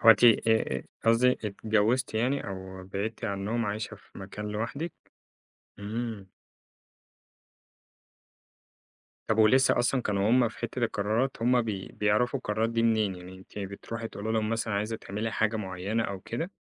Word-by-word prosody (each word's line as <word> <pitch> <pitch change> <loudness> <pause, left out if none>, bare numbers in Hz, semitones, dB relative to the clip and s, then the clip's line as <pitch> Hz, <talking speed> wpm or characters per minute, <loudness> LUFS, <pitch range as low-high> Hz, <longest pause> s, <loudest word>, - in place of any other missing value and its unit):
هو 115 - +9
أنتِ 115 +2 +6
آآ 110 - +4 0.2
قصدي 115 +3 +5
اتجوزتِ 110 +3 0
يعني 125 +5 +1
أو 95 -1 -7
بعدتِ 105 +5 -4
عنهم 105 +3 -1
عايشة 105 +2 -3
في 100 - -15
مكان 100 +2 -6
لوحدِك؟ 115 +10 -3 0.9
امم. 110 0 -4 3.0
طَب 110 - +1
ولسه 125 +5 +5
أصلًا 125 +1 +2
كانوا 100 0 +1
هُم 125 -1 +5
في 110 - -14
حتة 120 +2 -4
القرارات 110 +4 0
هُم 125 0 +4
بي 100 -4 -4
بيعرفوا 105 +6 +2
القرارات 110 -1 0
دي 115 0 +1
منين، 110 -4 +2
يعني 90 +1 -10
أنتِ 95 +2 -11
بتروحي 105 +3 -5
تقولي 110 +1 -4
لهم 110 -1 +1
مثلًا 115 -2 -1
عايزة 105 +3 -1
تعملي 110 +1 -4
حاجة 110 0 +1
معيّنة 100 +2 -2
أو 100 -2 -4
كده، 160 - -4
110 Hz, 145 wpm, -29 LUFS, 100-115 Hz, 3.0 s, هو